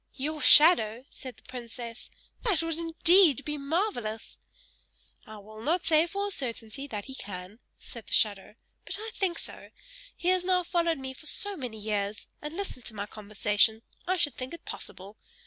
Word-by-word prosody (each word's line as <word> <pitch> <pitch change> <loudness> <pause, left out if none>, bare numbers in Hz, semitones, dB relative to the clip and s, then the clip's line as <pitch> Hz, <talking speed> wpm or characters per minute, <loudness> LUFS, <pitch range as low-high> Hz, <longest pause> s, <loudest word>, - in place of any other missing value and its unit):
"Your 300 +3 -3
shadow!" 260 -9 +7
said 255 -2 -8
the - - -19
princess. 240 -2 -8 0.3
"That 400 -9 +1
would 330 0 -2
indeed 330 - +5
be 300 -1 -3
marvellous!" 275 - -2 0.9
"I 215 - -9
will 215 +1 -11
not 330 +9 +1
say 320 +1 +5
for 400 +4 -2
a 405 - -3
certainty 245 - -4
that 210 -6 -5
he 265 - -9
can," 195 -2 -8 0.2
said 235 -3 -11
the - - -6
shadow, 205 -1 +1 0.3
"but 385 - -4
I 445 +1 -6
think 365 -4 0
so; - - -7 0.5
he 355 - 0
has 370 -1 +3
now 365 0 +2
followed 340 -2 +1
me 265 -1 -6
for 310 +4 -10
so 405 +6 -2
many 250 -8 -5
years, 210 0 -2 0.2
and 300 +3 -6
listened 375 -11 -5
to 220 - -5
my 200 0 -3
conversation 215 +1 +1 0.2
I 370 +1 +2
should 295 -5 +1
think 255 +5 -6
it - - -16
possible. 200 +3 -9
265 Hz, 180 wpm, -29 LUFS, 220-335 Hz, 0.9 s, shadow